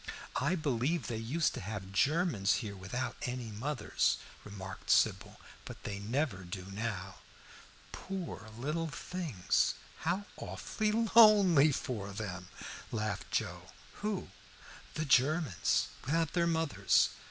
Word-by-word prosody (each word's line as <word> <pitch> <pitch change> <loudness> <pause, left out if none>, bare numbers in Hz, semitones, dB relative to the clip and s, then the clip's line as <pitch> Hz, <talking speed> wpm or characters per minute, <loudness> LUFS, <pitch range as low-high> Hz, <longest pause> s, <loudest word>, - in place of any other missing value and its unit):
"I 160 +7 +2
believe 150 0 0
they 115 - -3
used 135 +8 0
to - - -5
have 95 -1 -5
Germans 140 - +2
here 100 -1 -5
without 95 +7 -4
any 125 -2 -3
mothers," 135 +8 0 0.3
remarked 95 -2 -8
Sybil, - - +3 0.2
"but - - -9
they 100 -1 -4
never 120 +2 0
do 90 +1 -6
now." 100 -3 -4 0.7
"Poor 185 - -6
little 155 +6 -1
things, 155 - 0 0.2
how 180 +5 -1
awfully 215 -1 -2 0.2
lonely 195 -10 +8
for 110 -8 -3
them!" 95 -3 -5 0.4
laughed 110 -2 -2
Joe. - - -3 0.3
"Who?" 210 -2 -2 0.7
"The 155 - -1
Germans 140 - +3
without 165 +3 +1
their 170 -1 +2
mothers. 160 - +3
130 Hz, 120 wpm, -33 LUFS, 100-165 Hz, 0.7 s, lonely